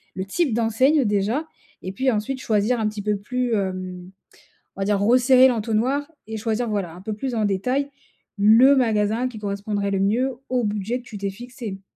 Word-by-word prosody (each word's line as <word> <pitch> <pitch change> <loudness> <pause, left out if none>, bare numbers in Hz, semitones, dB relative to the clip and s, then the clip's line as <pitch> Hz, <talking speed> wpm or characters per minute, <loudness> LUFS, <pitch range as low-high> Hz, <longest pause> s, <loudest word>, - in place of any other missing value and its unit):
Le 190 - -3
type 275 - 0
d'enseigne 250 +5 +2
déjà 210 +9 0 0.4
et 185 - -4
puis 260 +5 +1
ensuite 230 +5 -2
choisir 220 +2 +1
un 215 - +1
petit 210 -1 -6
peu 210 -1 0
plus, 245 +3 -2
hem, 185 -2 -4 0.7
on - - -8
va - - +1
dire 205 -1 +1
resserrer 250 +4 +5
l'entonnoir 240 +5 0 0.2
et 220 - -4
choisir, 225 +2 -1
voilà, 190 -6 -3
un 180 - -11
peu 215 - -4
plus 250 +3 -4
en 220 - 0
détail 250 +9 0 0.5
le 230 +7 +6
magasin 225 0 +1
qui 225 -4 -9
correspondrait 200 0 -2
le 195 - +1
mieux 240 +7 +1 0.2
au 250 -1 +1
budget 210 +4 -2
que 245 - -18
tu 210 - -8
t'es 200 0 -2
fixé. 230 -2 -8
220 Hz, 190 wpm, -23 LUFS, 200-250 Hz, 0.7 s, le